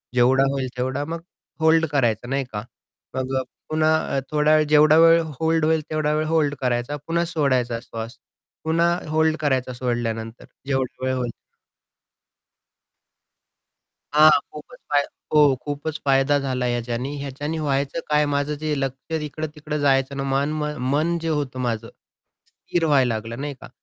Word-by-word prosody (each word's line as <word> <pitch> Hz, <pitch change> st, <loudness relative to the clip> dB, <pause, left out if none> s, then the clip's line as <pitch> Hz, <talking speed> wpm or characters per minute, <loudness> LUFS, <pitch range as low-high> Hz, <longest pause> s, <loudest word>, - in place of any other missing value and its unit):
जेवढा 130 Hz, +2 st, +4 dB
होईल 135 Hz, -2 st, -2 dB
तेवढा 130 Hz, +3 st, -1 dB
मग 165 Hz, +2 st, -5 dB, 0.4 s
होल्ड 160 Hz, +1 st, +4 dB
करायचा 120 Hz, -5 st, +1 dB
नाही 135 Hz, 0 st, 0 dB
का? 105 Hz, -1 st, -4 dB, 0.5 s
मग 130 Hz, 0 st, -2 dB
अ, -, -, 0 dB, 0.3 s
पुन्हा 155 Hz, -2 st, +1 dB
थोडा 150 Hz, +1 st, +4 dB
वेळ, 155 Hz, -, +4 dB
जेवढा 150 Hz, +1 st, +6 dB
वेळ 165 Hz, 0 st, +7 dB, 0.2 s
होल्ड 160 Hz, -1 st, +2 dB
होईल, 160 Hz, 0 st, +2 dB
तेवढा 155 Hz, -1 st, 0 dB
वेळ 155 Hz, +1 st, 0 dB
होल्ड 155 Hz, -3 st, +1 dB
करायचा. 125 Hz, +2 st, -1 dB
पुन्हा 170 Hz, +1 st, +1 dB
सोडायचा 130 Hz, -8 st, 0 dB
श्वास, 115 Hz, -1 st, -7 dB, 0.5 s
पुन्हा 165 Hz, +2 st, +2 dB, 0.2 s
होल्ड 160 Hz, 0 st, +2 dB
करायचा 130 Hz, -3 st, 0 dB
सोडल्यानंतर 120 Hz, -2 st, -3 dB, 0.2 s
जेवढा 130 Hz, -1 st, -2 dB
वेळ 130 Hz, -, +1 dB
होईल. 125 Hz, -2 st, -2 dB, 2.8 s
हां. 155 Hz, +1 st, +8 dB, 0.2 s
खूपच 200 Hz, +12 st, -11 dB
फाय 145 Hz, -, +5 dB, 0.3 s
हो 150 Hz, -, +7 dB, 0.2 s
खूपच 145 Hz, +2 st, -4 dB
फायदा 135 Hz, +1 st, +3 dB
झाला 130 Hz, -2 st, -1 dB
ह्याच्यानी. 120 Hz, +3 st, -2 dB
ह्याच्याने 145 Hz, +3 st, -4 dB
व्हायचं 140 Hz, +1 st, -1 dB
काय 150 Hz, 0 st, +3 dB
माझं 145 Hz, +1 st, 0 dB
जे 155 Hz, -1 st, 0 dB
लक्ष 135 Hz, +4 st, -4 dB
इकडं-तिकडं 150 Hz, 0 st, -5 dB
जायचं 135 Hz, -1 st, +2 dB
ना, 135 Hz, -, -2 dB
मन 140 Hz, +2 st, 0 dB, 0.4 s
मन 165 Hz, +4 st, +1 dB
जे 165 Hz, 0 st, -4 dB
होतं 145 Hz, -5 st, -2 dB
माझं. 115 Hz, -2 st, -2 dB, 0.6 s
स्थिर 170 Hz, -1 st, -3 dB
व्हायला 135 Hz, -6 st, +3 dB
लागलं 115 Hz, +3 st, -5 dB
नाही 145 Hz, 0 st, -4 dB
का? -, -, -11 dB
145 Hz, 145 wpm, -23 LUFS, 130-155 Hz, 2.8 s, हां